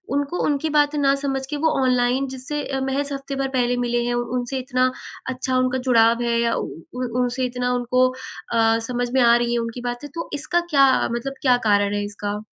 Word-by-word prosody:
उनको 285 +5 -1
उनकी 295 +1 0
बातें 295 0 +2
ना 275 -1 +4
समझ 270 -1 -1
के 295 - -1
वो 320 - +5
ऑनलाइन 255 +1 +2
जिससे 290 +3 -4
अ, 270 -1 -3
महज़ 275 +2 -2
हफ्ते 275 0 -5
भर 270 0 -1
पहले 245 0 +1
मिले 240 0 0
हैं। 240 - 0
उ 240 - 0
उनसे 250 +2 -3
इतना 255 0 +1 0.4
अच्छा 260 0 -1
उनका 255 0 +1
जुड़ाव 230 0 +4
है 235 0 +1
या 235 0 +1
उ - - -2
उ - - -6 0.4
उन 245 - -4
उनसे 250 +1 -1
इतना 250 0 -2
उनको 250 +1 +2 0.5
अ, 225 -1 +4
समझ 245 -1 -2
में 265 - +4
आ 235 -1 +6
रही 240 0 0
है 240 - +1
उनकी 230 +1 -4
बातें। 245 +5 -6
तो 335 - -5
इसका 305 +4 0
क्या 280 -4 +5
अ, 265 - +2
मतलब 250 +3 -3
क्या 250 -2 +5
कारण 205 0 +3
है 205 - -1
इसका? 205 0 -5
255 Hz, 225 wpm, -22 LUFS, 240-275 Hz, 0.5 s, आ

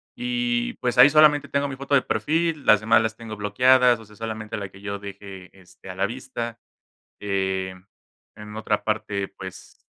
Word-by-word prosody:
y 245 0 -1
pues, 125 0 -3
ahí 130 +4 +9
solamente 150 -2 +5
tengo 140 +1 0
mi 135 - -7
foto 140 +1 0
de 135 - +5
perfil, 160 -1 -1
las 105 -1 +6
demás 110 +1 +4
las 110 -1 -2
tengo 110 -1 -8
bloqueadas, 125 +4 +4
o 110 - -13
sea, 105 - -18
solamente 110 -1 -5
la 100 -1 -5
que 95 +1 -16
yo 100 -1 -5
deje, 100 -2 -10
este, 95 +1 -16
a 90 - -7
la 95 - 0
vista. 120 -2 -6 0.6
Eh, 95 -2 -2 0.6
en 105 0 -10
otra 110 -1 -1
parte, 105 -2 -2
pues, 95 -1 -12
110 Hz, 180 wpm, -24 LUFS, 100-135 Hz, 0.6 s, ahí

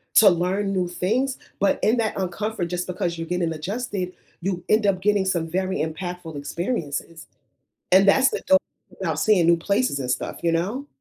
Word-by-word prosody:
to 210 - +9
learn 190 +3 0
new 185 -2 0
things, 230 +10 -1 0.2
but 200 - +2
in 225 +3 +3
that 220 -2 0
uncomfort, 195 +1 -2
just 180 0 -3
because 175 -2 -2
you're 165 0 -5
getting 175 -2 -1
adjusted, 190 +2 -3 0.3
you 180 -1 -2
end 215 -1 +4
up 185 -2 +1
getting 205 -1 +2
some 170 -3 0
very 185 +3 -1
impactful 170 +1 -4
experiences. 160 - -4 0.6
And 190 +2 +7
that's 265 +7 +6
the - - -3
dope 285 0 +6 0.4
about - - -1
seeing 205 -6 +4
new 170 - +6
places 200 - 0
and 125 -2 -2
stuff, - - -3
you 170 - +2
know? 200 +12 -1
185 Hz, 180 wpm, -24 LUFS, 170-205 Hz, 0.6 s, to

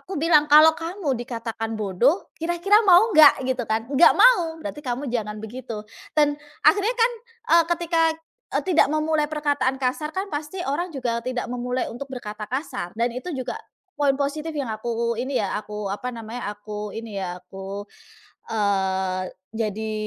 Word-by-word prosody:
aku 380 -1 -7
bilang, 310 -2 +4
"Kalau 310 +2 +8
kamu 330 -4 -2
dikatakan 230 -2 -4
bodoh, 215 - +1
kira-kira 345 +6 +3
mau 375 +6 +7
nggak?" 300 -3 +7
Gitu 255 -1 0
kan, 220 +1 -1
"Nggak 285 +4 +6
mau," 360 -9 +5
berarti 300 -1 -6
kamu 255 +3 -3
jangan 215 -3 -2
begitu. 230 -1 -7 0.3
Dan 295 -1 +4 0.3
akhirnya 405 +8 +4
kan, 470 +1 +4 0.5
eee, 335 - +4
ketika 335 -1 +1 0.5
e - - +3
tidak 355 -3 +4
memulai 310 -1 +1
perkataan 290 -3 0
kasar 265 +4 -1
kan 385 +2 -2
pasti 300 +5 -5
orang 340 +6 -1
juga 240 -3 -1
tidak 255 -1 -2
memulai 250 +1 -2
untuk 245 +4 -7
berkata 210 -4 -6
kasar 250 - -4
dan 235 +2 0
itu 255 +9 -6
juga 260 - -4 0.4
poin 280 -2 +3
positif 305 +3 -2
yang 275 -6 -3
aku 235 +1 -2
ini 260 +2 -1
ya, 195 - -2
aku 210 -1 -5
apa 250 +5 -3
namanya, 230 -1 -5
aku 210 0 -7
ini 225 -3 -6
ya, 180 -1 -4
aku 195 +2 -8 0.6
eee, 190 -3 0 0.3
jadi 220 0 -2
255 Hz, 160 wpm, -24 LUFS, 220-310 Hz, 0.6 s, Kalau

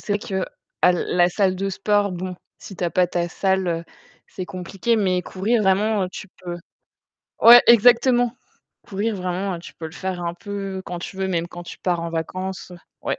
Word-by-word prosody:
c'est 205 - -3
vrai 190 -1 -2 0.4
qu'à 180 - +6
la 175 0 +2
salle 190 0 +1
de 195 +1 -2
sport, 205 +1 +1
bon, 180 +1 -5 0.2
si 195 - -11
tu - - -6
as 170 - 0
pas 180 +2 +3
ta 175 0 -2
salle, 190 0 0
heu, 165 0 -2 0.4
c'est 185 - -6
compliqué 195 +5 -2
mais 185 -3 +1
courir 215 +6 0
vraiment, 205 +2 +2
heu, - - -4
tu 195 - -8 0.2
peux 175 -1 -4 0.8
ouais, 240 +1 +10
exactement. 240 +1 +5 0.5
Courir, 210 +2 -1
vraiment, 185 +1 -2
heu, - - -6
tu 170 - -12
peux 160 - -7
le 160 - -11
faire 185 -1 -4
un 170 0 -3
peu 195 -1 -5
quand 175 0 -5
tu 190 - -8
veux, 190 0 -1
même 170 -2 -1
quand 175 - -9
tu 175 - -10
pars 175 -2 -1
en 170 - -3
vacances 185 +3 -4 0.3
ouais. - - -2
190 Hz, 200 wpm, -22 LUFS, 175-205 Hz, 0.8 s, ouais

